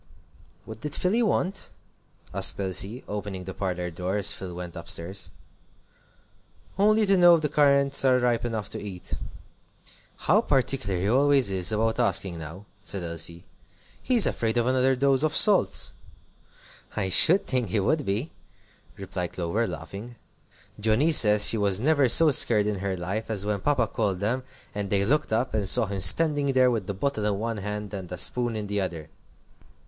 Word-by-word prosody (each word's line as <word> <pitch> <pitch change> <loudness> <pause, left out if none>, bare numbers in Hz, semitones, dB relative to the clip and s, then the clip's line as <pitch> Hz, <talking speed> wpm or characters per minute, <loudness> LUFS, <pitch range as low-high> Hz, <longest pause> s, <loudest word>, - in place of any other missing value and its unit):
"What 110 0 -10
did 150 0 -4
Philly 205 +6 0
want?" 195 -3 -2 0.6
asked 95 +1 +4
Elsie, 100 +5 0
opening 100 -2 -6
the 95 +1 -8
parlor 90 -2 -4
door 90 +4 -4
as 100 - +3
Phil 90 -2 -9
went 90 -1 -8
up 85 -1 -9
stairs. 90 +2 -2 1.5
"Only 215 +2 +2
to 195 0 +2
know 175 -1 +6
if 160 - -3
the 150 - -1
currants 140 -2 +2
are 130 -1 +3
ripe 120 -2 0
enough 110 -4 -4
to - - -6
eat." 95 -4 -8 1.1
"How - - +3
particular 130 -8 -1
he 95 - -2
always 135 -1 +2
is 95 -1 0
about 110 +2 -1
asking 95 -6 +1
now!" 80 +6 -10 0.2
said 95 -2 -5
Elsie; 85 0 -3 0.6
"he's 245 -6 +5
afraid 115 0 -2
of 120 - +1
another 130 +1 +1
dose 135 0 +1
of 155 0 0
salts." 205 -3 +3 1.0
"I 95 - -2
should 175 - +4
think 125 -6 -1
he 105 - -1
would 145 +10 0
be," 110 +8 -3 0.7
replied 90 -1 -6
Clover, 95 +7 -2
laughing. 115 +5 -9 0.6
"Johnnie 110 +9 +1
says 105 -7 +6
she 115 - +1
never 110 +10 +1
was 120 - +5
so 160 -2 +6
scared 110 -5 +5
in 105 -2 -3
her 95 -1 -4
life 95 +6 -5
as 105 -3 -2
when 105 -1 -2
Papa 140 0 0
called 100 -3 -3
them, 115 +6 -2 0.3
and 100 -1 -5
they 100 0 0
looked 150 +4 0
up, 120 +4 -1
and 105 -3 -1
saw 105 - +5
him 100 -1 -5
standing 140 - +2
there 130 -1 +3
with 110 -6 -3
the 100 - -4
bottle 110 0 -3
in 100 -2 -1
one 115 +1 -4
hand 105 +1 -6
and 95 -3 -8
a 90 - -5
spoon 120 +6 0
in 105 -1 -4
the 100 0 -3
other!" 85 -5 -6
105 Hz, 175 wpm, -25 LUFS, 95-135 Hz, 1.5 s, know